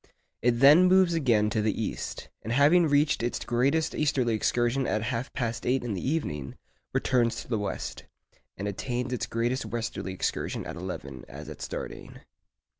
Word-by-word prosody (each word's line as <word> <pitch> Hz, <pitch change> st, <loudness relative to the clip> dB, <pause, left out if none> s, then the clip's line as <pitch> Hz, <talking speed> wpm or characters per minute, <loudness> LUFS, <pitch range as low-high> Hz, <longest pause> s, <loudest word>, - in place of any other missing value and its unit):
It 120 Hz, 0 st, +2 dB
then 150 Hz, +7 st, +8 dB
moves 185 Hz, -1 st, +5 dB
again 115 Hz, -9 st, +2 dB
to 110 Hz, -, +1 dB
the 105 Hz, 0 st, 0 dB
east, 110 Hz, -, -4 dB
and 110 Hz, -, -5 dB
having 150 Hz, +7 st, +5 dB
reached 145 Hz, -1 st, +3 dB
its 120 Hz, +1 st, -1 dB
greatest 140 Hz, +7 st, +1 dB
easterly 130 Hz, -6 st, +1 dB
excursion 120 Hz, +4 st, +1 dB
at 110 Hz, 0 st, 0 dB
half 120 Hz, +2 st, -3 dB
past 115 Hz, -2 st, -2 dB
eight 130 Hz, +1 st, +1 dB
in 120 Hz, -3 st, -2 dB
the 95 Hz, -, -3 dB
evening, 75 Hz, -, -2 dB, 0.4 s
returns 120 Hz, -3 st, +2 dB
to -, -, -18 dB
the 115 Hz, -3 st, -1 dB
west, 105 Hz, -, -4 dB, 0.5 s
and 100 Hz, -, -3 dB
attains 125 Hz, +5 st, -3 dB
its 125 Hz, -, -2 dB
greatest 120 Hz, +3 st, -1 dB
westerly 115 Hz, -4 st, -4 dB
excursion 95 Hz, -, -2 dB
at 80 Hz, -, -6 dB
eleven, 85 Hz, -7 st, -6 dB
as -, -, -9 dB
at -, -, -9 dB
starting. -, -, -6 dB
120 Hz, 170 wpm, -28 LUFS, 110-140 Hz, 0.5 s, then